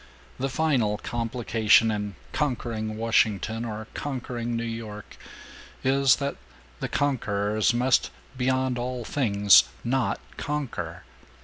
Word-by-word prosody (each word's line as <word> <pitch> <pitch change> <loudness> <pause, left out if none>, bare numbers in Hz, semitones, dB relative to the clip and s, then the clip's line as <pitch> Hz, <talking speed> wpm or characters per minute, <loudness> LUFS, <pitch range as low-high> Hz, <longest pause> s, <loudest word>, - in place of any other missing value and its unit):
The 135 +1 0
final 130 -8 +1
complication 115 -1 +2
in 105 -2 -3 0.2
'conquering 115 -6 -2
Washington' 110 0 +1
or 110 -1 -5
'conquering 120 -4 -4
New 115 - -1
York' 115 -2 -6 0.7
is 135 0 +4
that 140 0 -3 0.4
the - - -3
conquerors 110 -6 +1
must 125 - +2 0.3
beyond 130 0 0
all 125 -1 -3
things 105 -8 +5 0.2
not 130 +2 0 0.2
conquer! 150 -3 -4
115 Hz, 105 wpm, -26 LUFS, 110-130 Hz, 0.7 s, things